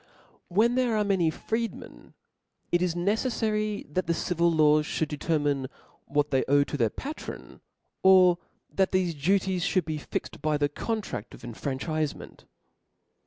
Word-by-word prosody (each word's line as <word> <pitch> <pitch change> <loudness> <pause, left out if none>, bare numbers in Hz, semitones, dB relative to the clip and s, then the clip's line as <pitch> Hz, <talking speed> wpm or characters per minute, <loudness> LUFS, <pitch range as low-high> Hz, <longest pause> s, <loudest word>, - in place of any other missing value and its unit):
When 220 +7 +3
there 245 -3 +1
are 210 - +2
many 190 -5 +2
freedmen, 225 +8 -5 0.6
it 175 - +2
is 180 -2 0
neceffary 215 +2 0
that 185 0 -1
the 170 - +1
civil 170 0 +1
laws 150 -1 +4
fliould 160 - -1
determine 145 -3 0 0.4
what 145 +1 0
they 135 -1 +2
owe 140 +1 +5
to 145 - -6
their 115 -6 +2
patron, 295 - -8 0.4
or 185 -2 +6 0.3
that 190 -1 +1
thefe 175 -6 0
duties 190 +1 +1
fliould 185 -1 +1
be 155 -1 -3
fixed - - -5
by 155 -1 +1
the 145 0 +1
contrad 210 - -4
of - - -17
infranchifement. 140 +5 -4
170 Hz, 145 wpm, -27 LUFS, 150-200 Hz, 0.6 s, or